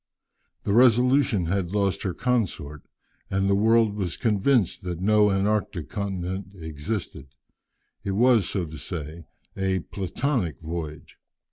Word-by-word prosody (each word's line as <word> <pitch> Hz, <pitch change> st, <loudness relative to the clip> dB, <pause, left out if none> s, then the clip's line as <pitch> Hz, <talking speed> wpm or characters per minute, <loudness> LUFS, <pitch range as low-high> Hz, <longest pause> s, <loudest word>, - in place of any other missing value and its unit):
The 100 Hz, -, 0 dB
Resolution 125 Hz, -3 st, +4 dB
had 90 Hz, +1 st, -1 dB
lost 100 Hz, -2 st, +1 dB
her 95 Hz, -, -2 dB
consort, 90 Hz, -, -1 dB, 0.5 s
and 95 Hz, 0 st, +1 dB
the 100 Hz, -, +3 dB
world 110 Hz, +1 st, +4 dB
was 95 Hz, -5 st, -3 dB
convinced 110 Hz, -2 st, +2 dB
that 90 Hz, -2 st, -4 dB
no 105 Hz, +2 st, +4 dB
Antarctic 100 Hz, -3 st, 0 dB
continent 95 Hz, -1 st, -4 dB
existed. 80 Hz, -1 st, -5 dB, 0.8 s
It 95 Hz, -, -2 dB
was, 115 Hz, -2 st, +4 dB
so 95 Hz, -4 st, -1 dB
to 80 Hz, -1 st, -9 dB
say, 80 Hz, -1 st, -6 dB, 0.3 s
a 95 Hz, -1 st, 0 dB
"platonic" 100 Hz, -, -2 dB
voyage. 80 Hz, -1 st, -7 dB
95 Hz, 125 wpm, -25 LUFS, 85-110 Hz, 0.8 s, Resolution